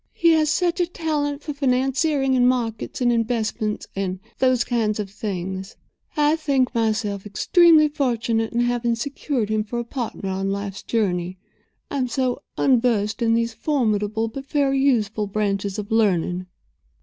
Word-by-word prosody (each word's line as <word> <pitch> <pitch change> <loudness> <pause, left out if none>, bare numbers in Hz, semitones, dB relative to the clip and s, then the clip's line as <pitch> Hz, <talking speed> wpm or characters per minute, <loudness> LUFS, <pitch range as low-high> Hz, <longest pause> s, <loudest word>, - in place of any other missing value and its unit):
He 335 0 +4
has 310 -2 +3
such 345 +3 +1
a 350 - +2
talent 295 -4 -2
for 300 - -4
financiering 270 +1 +1
and 250 0 +4
markets 235 -2 -2
and 240 -1 +3
investments 225 -2 -1
and 190 -1 -2 0.2
those 255 -2 +3
kind 220 -3 0
of 200 -2 -4
things. 190 -2 -5 0.4
I 300 +1 +4
think 275 -5 +1
myself 215 -4 0
extremely 310 - +5
fortunate 235 -6 0
in 240 - +1
having 240 -1 +1
secured 260 -2 -2
him 215 0 +1
for 220 +3 -5
a 235 - -1
partner 235 -5 -5
on 190 +1 -2
life's 200 0 -4
journey—I 185 +4 -4
am 255 - 0
so 255 0 -1 0.2
unversed 230 -4 +2
in 230 -1 +3
those 230 0 0
formidable 220 -4 0
but 270 +5 -8
very 275 -2 +2
useful 220 -6 +1
branches 200 -1 -1
of 210 +1 -6
learning." 185 -4 +1
230 Hz, 150 wpm, -23 LUFS, 210-270 Hz, 0.4 s, extremely